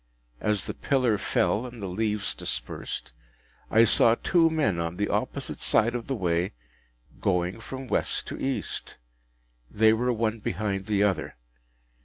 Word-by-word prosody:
As 105 -3 +1
the - - -4
pillar 125 -7 +1
fell 110 +5 +1
and 120 -1 -10
the 100 - -4
leaves 105 +2 -1
dispersed, - - -5 0.6
I 115 +1 +6
saw 115 0 +5
two 165 +5 +3
men 145 - +1
on 85 +1 -3
the 100 +1 0
opposite - - -2
side 115 +2 +3
of 120 -1 -4
the 135 - -1
way, 90 - 0 0.7
going 90 +2 0
from 130 +4 -7
West - - 0
to - - -6
East. 135 0 -3 0.7
They 110 +1 +4
were 125 +3 +1
one 115 -1 -1
behind 100 -1 -2
the 105 -1 +2
other. 100 -3 0
110 Hz, 150 wpm, -27 LUFS, 100-120 Hz, 0.7 s, I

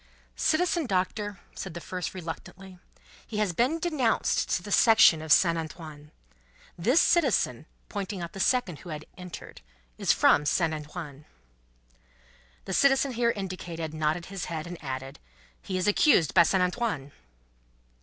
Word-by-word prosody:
"Citizen 335 -1 +1
Doctor," 200 0 -2
said 190 -4 -7
the - - -4
first, 180 +2 -5
reluctantly, 185 +2 -8 0.5
"he 215 - -6
has 210 -4 0
been 250 - +1
denounced 305 -9 0
to 180 - 0
the 205 - -8
Section 220 -8 +6
of 160 -1 -5
Saint 170 -1 +5
Antoine. 155 -2 -9 0.7
This 235 - +3
citizen," 235 - +2 0.2
pointing 200 -1 -5
out 170 -1 -6
the 195 - -8
second 195 - +1
who 180 - -11
had 155 -1 -6
entered, 180 -1 -10 0.4
"is - - +3
from 150 - +4
Saint 165 0 +1
Antoine." 150 -1 -8 1.4
The 190 - -4
citizen 270 +3 +3
here 235 -1 +1
indicated 175 -6 -5
nodded 155 +2 -1
his 195 -1 -5
head, 160 -2 -5
and 175 -2 -9
added: 135 0 -6 0.4
"He 185 - -4
is 185 +2 -1
accused 205 - +4
by 180 - +7
Saint 180 +2 +3
Antoine." 180 - -2
180 Hz, 145 wpm, -27 LUFS, 160-215 Hz, 1.4 s, by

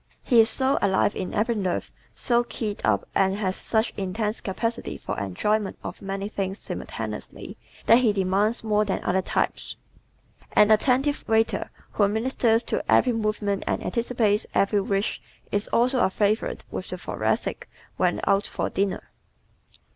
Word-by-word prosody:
He 240 -4 +4
is 225 - +2
so 265 +4 +1
alive 195 +1 +2
in 185 - -4
every 225 +3 +1
nerve, 190 -5 -2 0.2
so 240 -2 +2
keyed 215 -3 -4
up 105 -3 +1
and 190 0 +2
has 190 -2 -1
such 220 0 0
intense 210 +3 -2
capacity 230 +4 -3
for - - -5
enjoyment 195 - -1
of - - -7
many 195 +1 -3
things 195 -2 -3
simultaneously - - -6 0.3
that 230 - +7
he 240 -4 +3
demands 200 +4 +1
more 210 -1 +2
than 200 -2 -2
other 185 +1 +1
types. - - -2 0.8
An 210 +1 +5
attentive 260 +6 +2
waiter 225 0 +1 0.2
who 205 - +3
ministers 225 +1 +1
to - - -2
every 250 - +4
movement 215 -3 -1
and - - -1
anticipates 230 -3 0
every 200 +1 +3
wish 195 +1 -1 0.3
is 205 +1 0
also 250 +2 +2
a - - +4
favorite 210 +3 0
with - - -5
the - - -4
Thoracic - - -2 0.3
when - - +1
out 195 +1 +2
for - - -3
dinner. 195 0 -2
210 Hz, 155 wpm, -25 LUFS, 195-230 Hz, 0.8 s, that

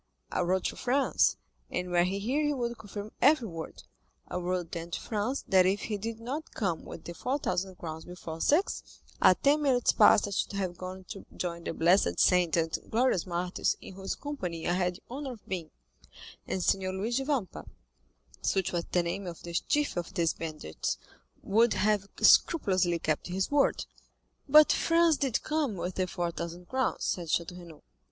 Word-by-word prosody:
I - - -1
wrote 180 +1 +1
to - - -2
Franz—and 245 -8 0
were 175 0 +4
he 190 +2 -1
here 255 +9 0
he 295 -1 +1
would 235 -2 -3
confirm 205 0 -7
every 270 -3 +5
word—I 165 +1 -9
wrote 180 -1 -2
then 170 0 -5
to - - -3
Franz 225 +5 -2
that 185 -1 +5
if 195 +2 +1
he 215 -2 -3
did 225 +2 -4
not 270 +7 -6
come 175 -6 -1
with - - -9
the 170 - -7
four 255 +10 -1
thousand 185 -7 -2
crowns 160 -1 -7
before 165 -2 -8
six, 335 +7 +2 0.4
at - - +5
ten 290 +2 +4
minutes 260 -4 +3
past 210 -1 +6
I - - -6
should 200 - -1
have 190 -3 -2
gone 185 +1 -7
to 195 - -8
join 170 -1 -4
the - - -2
blessed 175 +4 +3
saints 180 -3 +4
and 165 -1 +1
glorious 225 -6 +2
martyrs 180 +1 -1
in - - -10
whose 190 +1 -4
company 180 - -5
I 175 - +2
had 180 -1 0
the - - -14
honor 270 0 -4
of 225 - -15
being; 175 -4 -4 0.8
and 185 - -2
Signor 190 -1 +1
Luigi 230 +7 -1
Vampa, 265 - -2 0.7
such 190 -2 0
was 170 -1 -2
the 175 - +2
name 180 +3 -3
of 170 -2 -8
the 170 - -7
chief 295 +10 0
of 175 +2 -4
these 170 -3 +2
bandits, 155 - -4 0.5
would 225 +3 +3
have 205 -2 +1
scrupulously 185 - +4
kept 155 -2 -1
his 190 +6 -2
word." 285 -1 +2 0.6
"But 305 +2 +8
Franz 330 -2 +3
did 270 -5 0
come 305 -8 0
with 180 +1 -3
the 185 0 -1
four 175 -2 -2
thousand 170 +1 -7
crowns," 260 0 -1
said 175 -2 -2
Château 175 +3 -1
Renaud. 170 -3 -13
190 Hz, 185 wpm, -29 LUFS, 175-240 Hz, 0.8 s, But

